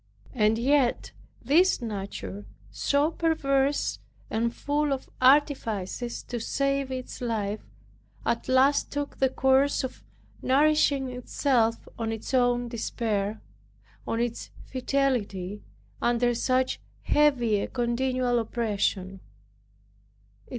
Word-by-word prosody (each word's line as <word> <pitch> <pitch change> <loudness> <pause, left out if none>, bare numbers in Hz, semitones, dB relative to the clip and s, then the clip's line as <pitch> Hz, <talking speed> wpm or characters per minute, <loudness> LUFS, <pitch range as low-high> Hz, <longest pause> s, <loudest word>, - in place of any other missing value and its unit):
And 215 -1 +3
yet 260 +1 +2 0.3
this 330 +10 +4
nature 195 - -6 0.2
so 285 - +1
perverse, 285 -4 +1 0.3
and 230 +1 0
full 290 +3 -1
of 265 - -5
artifices 245 -5 +2
to 240 - -5
save 275 +3 0
its 255 0 -6
life, 215 -3 -2 0.6
at 230 - -1
last 265 +2 +3
took 285 0 -4
the 265 - +3
course 265 +2 +2
of 260 - -6 0.4
nourishing 280 -1 +3
itself 250 -2 0
on 225 -1 -1
its 225 +3 -6
own 245 -1 +2
despair, 220 -3 -2 0.7
on 230 - -1
its 235 -1 -2 0.2
fidelity 245 -8 -1 0.4
under 240 0 +2
such 255 +2 0 0.2
heavy 245 -8 +3
and - - -4
continual 245 0 0
oppression. 205 -4 -1
245 Hz, 100 wpm, -27 LUFS, 225-275 Hz, 0.7 s, this